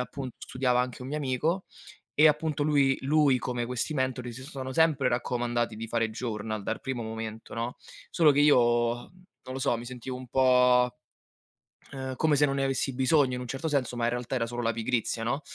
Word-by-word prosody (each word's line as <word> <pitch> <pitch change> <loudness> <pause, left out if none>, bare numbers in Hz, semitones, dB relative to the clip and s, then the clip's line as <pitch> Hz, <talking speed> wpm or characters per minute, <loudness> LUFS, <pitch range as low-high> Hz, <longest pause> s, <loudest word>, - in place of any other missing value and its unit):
appun 130 +1 -5
studiava 125 -1 0
anche 125 0 -4
un 125 - -7
mio 150 - -3
amico 150 +6 -1 0.5
e, 155 +2 +6
appunto, 150 -1 0
lui 140 -3 +3
lui 140 -2 +3
come 120 -1 -2
questi 125 +5 -2
mentori 130 -3 -2
si 130 +2 -9
sono 130 -2 -6
sempre 150 -2 +3
raccomandati 120 -1 -1
di 115 +1 -6
fare 115 0 0
journal 110 -2 -4
dar 110 - -3
primo 130 -3 -4
momento, 110 0 -6
no, 115 +2 -4 0.3
solo 160 -4 +5
che 140 - +1
io, 145 0 +6 0.4
non 180 +2 -14
lo 135 - -4
so, 135 -3 +1
mi 120 - -8
sentivo 125 +1 -6
un 130 0 -8
po', 125 -1 +4 1.0
ehm, 130 -1 -5
come 155 0 +3
se 145 - +4
non 140 -1 +1
ne 135 - +1
avessi 135 0 -1
bisogno 130 0 +3
in 125 - -4
un 125 - -6
certo 135 +6 -3
senso, 135 -4 -1
ma 120 - -1
in 120 - +2
realtà 120 +1 -3
era 120 -3 0
solo 120 +1 -5
la 115 - +1
pigrizia, 115 0 -1
no, 135 +5 -1
130 Hz, 205 wpm, -28 LUFS, 120-140 Hz, 1.0 s, e